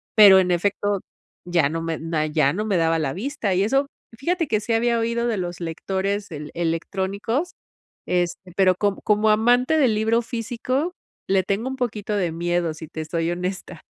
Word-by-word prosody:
pero 200 -4 +9
en 185 -1 +1
efecto, 200 +2 0 0.4
ya 170 -5 +2
no 165 +1 -3
me 165 -1 -3 0.3
ya 150 -3 +3
no 210 +4 -2
me 200 -4 +1
daba 165 0 +2
la 140 -4 -1
vista. 230 -1 -2
Y 185 - +2
eso 270 +7 +2 0.3
fíjate 335 +5 0
que 215 -5 +1
sí 230 - -1
había 235 +1 +2
oído 235 +1 0
de 230 -3 0
los 175 -1 -4
lectores 190 +4 -2 0.3
electrónicos, 195 - -2 0.6
este, 180 +1 -1
pero 185 -2 +4
co 200 +1 0
como 215 0 +3
amante 245 +7 +3
del 255 -7 +3
libro 220 +2 +2
físico, 245 +7 -2 0.4
le 190 0 +3
tengo 200 +6 -1
un 265 - -5
poquito 215 -5 -2
de 180 -4 0
miedo, 170 0 -1
si 160 0 -9
te 160 0 -5
soy 165 +1 -1
honesta. 180 +2 -4
200 Hz, 175 wpm, -23 LUFS, 175-230 Hz, 0.6 s, pero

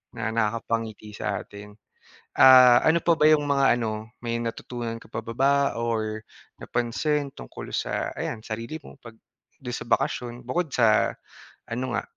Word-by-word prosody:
na 110 - -3
nakakapangiti 115 -1 -2
sa - - -3
atin, 105 0 -12 0.6
ah, 125 -2 +8
ano 165 +1 +4
pa 170 0 +2
ba 150 - +2
'yong 155 -1 +5
mga 140 -1 +2 0.2
ano, 110 0 -4
may 115 -1 -2
natutunan 115 0 -5
ka - - -16
pa 110 - -6
ba 115 - -6
ba 135 +4 +3 0.3
or 110 -2 -2 0.4
napansin 140 +4 -1
tungkol - - -10
sa, - - -2
ayan, 110 -2 -5
sarili 115 +7 -5
mo, 140 - -14
'pag 115 -3 -13 0.4
do'n 125 -3 -7
sa 120 - -6
bakasyon, 125 -2 -1
bukod 165 +7 -1
sa 115 -5 +2 0.5
ano 125 +1 -4
nga, - - -1
120 Hz, 160 wpm, -25 LUFS, 110-135 Hz, 0.6 s, ah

